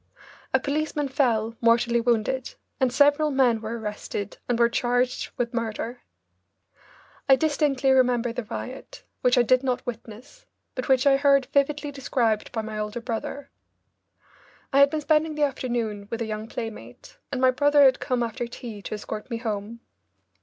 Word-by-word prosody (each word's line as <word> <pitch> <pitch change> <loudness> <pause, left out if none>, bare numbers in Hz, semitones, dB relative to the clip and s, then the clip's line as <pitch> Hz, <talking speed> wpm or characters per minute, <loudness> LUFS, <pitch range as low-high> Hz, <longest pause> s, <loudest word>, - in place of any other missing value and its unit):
A 265 - +3
policeman 295 +1 -2
fell, 230 -5 +1
mortally 235 0 +3
wounded, 240 +2 0 0.2
and 260 -2 +2
several 290 +3 +4
men 255 -5 +2
were 225 +2 -4
arrested 210 -2 -5
and 245 - +2
were 235 0 +5
charged 245 +1 0
with 240 0 -2
murder. 230 +1 -4 1.3
I 270 - +9
distinctly 285 -3 +1
remember 250 -2 +3
the 245 -1 -4
riot, 255 +4 -8 0.2
which 250 0 +3
I 245 - +6
did 255 +2 +3
not 255 -2 -2
witness, 240 - -9 0.3
but 255 - -4
which 260 0 +4
I 275 -1 +5
heard 275 -1 +4
vividly 290 +1 +1
described 240 -5 -1
by 220 -2 -3
my 215 0 -5
older 210 +2 -3
brother. 245 +4 -5 1.2
I 275 - +5
had 280 0 +7
been 310 +1 -2
spending 310 +1 +2
the 300 - 0
afternoon 235 -7 -2
with 230 - -4
a 230 - -2
young 215 0 -5
playmate, 220 - -8
and 265 - -2
my 260 0 +5
brother 290 +2 +4
had 260 -1 +5
come 250 -2 -1
after 235 +1 -3
tea 235 -3 -8
to 215 - -5
escort 210 +1 -7
me 230 - -2
home. 225 0 -4
245 Hz, 165 wpm, -25 LUFS, 230-275 Hz, 1.3 s, I